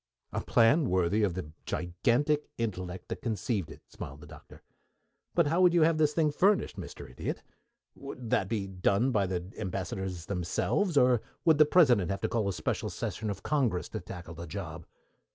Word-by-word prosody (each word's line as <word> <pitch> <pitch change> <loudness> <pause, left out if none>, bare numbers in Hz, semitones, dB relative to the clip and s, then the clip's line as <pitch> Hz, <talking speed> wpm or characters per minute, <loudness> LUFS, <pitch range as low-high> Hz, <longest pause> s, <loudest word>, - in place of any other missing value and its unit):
"A - - -1
plan 125 +5 +4
worthy 95 +3 +2
of 95 -5 +1
the 90 -5 -5 0.2
gigantic 120 - 0
intellect 95 -5 -4
that - - -5
conceived 110 - -2
it," - - -12
smiled 70 +2 -9
the - - -11
Doctor. 75 0 -14 0.7
"But 170 - +4
how 165 +5 +2
would 180 -1 +5
you 170 - +6
have 160 0 +3
this 150 -1 +4
thing 155 -1 +2
furnished, 195 +6 +2
Mr. - - -8
Idiot? 65 - -5 0.5
Would 125 -4 -8
that 95 -2 +2
be 105 -4 -1
done 100 +6 +1
by 100 -5 +2
the 90 +1 -4
Ambassadors 95 -2 -4
themselves, 100 - 0
or 125 -3 +5 0.2
would 160 -3 +5
the 155 - +7
President 125 - +5
have 100 0 -2
to - - 0
call 110 -4 0
a - - -1
special - - -2
session 110 -1 -4
of 100 -2 -5
Congress 130 -12 0
to - - -4
tackle 85 -1 -9
the 85 +1 -8
job?" 80 -2 -6
105 Hz, 185 wpm, -30 LUFS, 90-145 Hz, 0.7 s, the